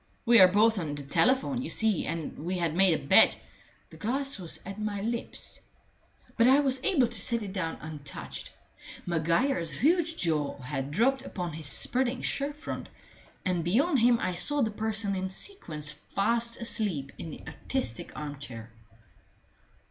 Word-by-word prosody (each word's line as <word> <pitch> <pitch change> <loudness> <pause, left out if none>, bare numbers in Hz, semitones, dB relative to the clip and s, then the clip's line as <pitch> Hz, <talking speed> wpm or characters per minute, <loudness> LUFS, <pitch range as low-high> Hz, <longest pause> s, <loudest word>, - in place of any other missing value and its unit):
We 235 -1 +7
are 185 - +10
both 210 +3 +3
on 150 -4 -3
the 145 - -6
telephone, 255 - +2
you 270 - -5
see. 220 -5 +1
And 165 -1 -4
we 180 +4 -2
had 170 -3 0
made 180 -2 +4
a - - -11
bet - - +6 0.3
" - - -32
The 160 - -12
glass 265 - -2
was 175 -3 -3
at 195 +2 -7
my 210 -1 -2
lips, 230 +3 -2 0.7
but 230 0 +4
I 265 +2 +6
was 265 -2 0
able 280 -10 +3
to 230 -4 -1
set 235 +2 +2
it 195 -2 -6
down 165 -5 -2
untouched. 150 -3 -6 0.5
Maguire's 170 - +1
huge 325 - +1
jaw 155 -4 0
had 135 0 -4
dropped 250 - +2
upon 175 - -5
his 155 -1 -3
spreading 250 - +1
shirt 285 +1 -1
front, 300 - -6 0.6
and 180 -3 0
beyond 265 - +2
him 235 +1 +5
I 185 - -1
saw 285 +10 +2
the 220 - 0
person 215 -1 -2
in 190 0 -2
sequins 165 - -5
fast 230 +9 -1
asleep 195 - -1
in 165 - -6
the - - -9
artistic 255 - -2
armchair. 130 -6 -7
195 Hz, 165 wpm, -29 LUFS, 160-245 Hz, 0.7 s, are